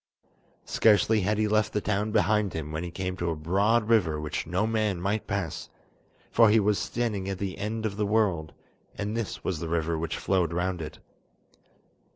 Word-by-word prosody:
Scarcely 110 0 +4
had 105 +3 +1
he 110 0 +2
left 105 0 +1
the 105 - +1
town 105 +1 -1
behind 105 -2 +2
him 80 -1 -4
when 80 +2 -3
he 90 - -4
came 90 +1 -4
to 85 0 -1
a 80 - -1
broad 100 +8 +2
river 90 -10 +3
which 75 0 -4
no 90 +5 0
man 110 -4 0
might 100 +4 -1
pass, 100 -6 -3 0.6
for 115 -2 +6
he 110 +1 +5
was 105 0 +2
standing 105 -5 -2
at 95 - -3
the 95 -1 -4
end 110 +2 -3
of 100 -2 -3
the 105 -1 0
world, 95 -8 +1 0.4
and 105 +2 -3
this 115 -3 -4
was 90 -4 -2
the 85 - -4
river 80 -1 0
which 80 0 -3
flowed 90 -4 +1
round 90 0 -1
it. 75 - -7
100 Hz, 195 wpm, -27 LUFS, 85-105 Hz, 0.6 s, for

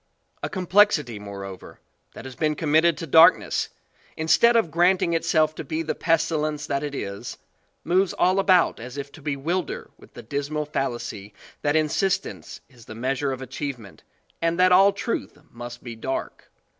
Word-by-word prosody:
A - - -3
complexity 180 - +2
moreover, 100 -2 -9 0.4
that - - -10
has 130 -1 -8
been 155 +2 0
committed 160 +2 +2
to - - -5
darkness, 160 +2 +5 0.5
instead 235 +9 +4
of 225 -9 +2
granting 175 0 +2
it 165 - 0
self 155 -1 +2
to - - -7
be 160 0 -3
the 160 - -2
pestilence 155 -2 0
that 140 -1 -2
it 145 -1 -4
is, 100 -5 -6 0.5
moves 185 +3 +2
all 185 +2 +2
a - - +2
bout 185 -3 +3
as 125 +4 -9
if 140 0 -6
to 160 - -14
bewilder 150 +6 -3
with - - -19
the - - -9
dismal 145 +5 -3
fallacy 120 -7 -4 0.3
that 145 +1 +1
insistence 180 +5 -1
is 125 -4 -18
the 110 - -10
measure 135 +4 -1
of 130 0 -5
achievement 130 -5 -7 0.4
and 165 +1 0
that 185 0 +5
all 195 +2 +7
truth 230 - -4
must 120 0 -9
be 120 -2 -7
dark. 130 +4 -5
150 Hz, 170 wpm, -24 LUFS, 130-170 Hz, 0.5 s, all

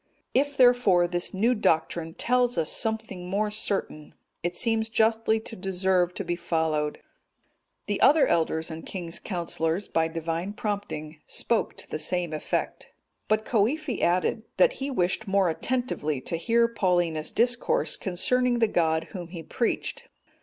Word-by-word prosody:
If, 285 +2 +1
therefore, 245 -9 +5
this 175 0 -2
new 225 +6 +2
doctrine 165 -5 0
tells 245 0 +1
us 160 -2 +1
something 220 -5 -2
more 210 +2 0
certain, 200 -7 -2 0.3
it 175 +1 -2
seems 225 -1 +1
justly 220 0 +2
to 225 - -7
deserve 185 -2 0
to - - -3
be 175 -1 -2
followed." 160 -3 -1 0.9
The - - -2
other 305 0 +6
elders 160 -1 0
and 160 0 -7
king's 170 -3 -5
counsellors, 170 0 -2
by 160 0 +1
Divine 165 +4 -3
prompting, 200 -8 -4
spoke 230 - -1
to - - -10
the 155 - -4
same 175 -1 -1
effect. 155 - -3 0.4
But 215 0 +1
Coifi 250 +6 0
added, 180 +5 +1 0.2
that - - +5
he 275 +1 -4
wished 190 -3 -1
more 195 -2 +3
attentively 200 - -1
to 165 - -3
hear 230 +8 +2
Paulinus 175 -8 0
discourse 240 +1 +1
concerning 245 +7 +1
the 230 -1 +3
God 160 -4 +1
Whom 180 -4 -6
he 170 -1 -8
preached. 235 +8 -2
190 Hz, 145 wpm, -26 LUFS, 165-225 Hz, 0.9 s, other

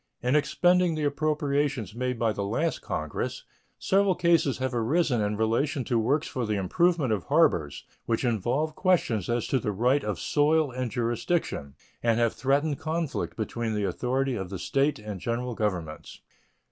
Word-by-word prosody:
In 125 +3 +2
expending 175 +3 +3
the 155 - -2
appropriations 145 - 0
made 125 +1 -2
by 115 -1 +1
the 100 - -3
last 135 +12 -1
Congress - - -4 0.3
several 195 -1 +2
cases 170 -6 +2
have 130 -1 -2
arisen 125 +1 +1
in 105 0 -1
relation 125 +6 0
to 120 -1 0
works 140 +8 +1
for 125 - -3
the 105 - 0
improvement 140 - +1
of 100 - -3
harbors 85 - +2 0.2
which 115 +2 0
involve 125 +7 0
questions 155 - +1
as 120 0 0
to 130 - +1
the 105 - -2
right 125 +8 +2
of - - -3
soil 150 -1 +2
and 125 0 -3
jurisdiction, 115 - -2 0.3
and 115 -1 +2
have 115 -1 +2
threatened 140 +2 0
conflict 160 -1 -3
between 110 0 -2
the 105 - -1
authority 130 +7 -1
of 95 -4 -4
the 95 - -5
State 140 +9 +1
and 105 -2 -7
General 120 +1 -2
Governments. 90 -8 -4
125 Hz, 165 wpm, -27 LUFS, 110-150 Hz, 0.3 s, expending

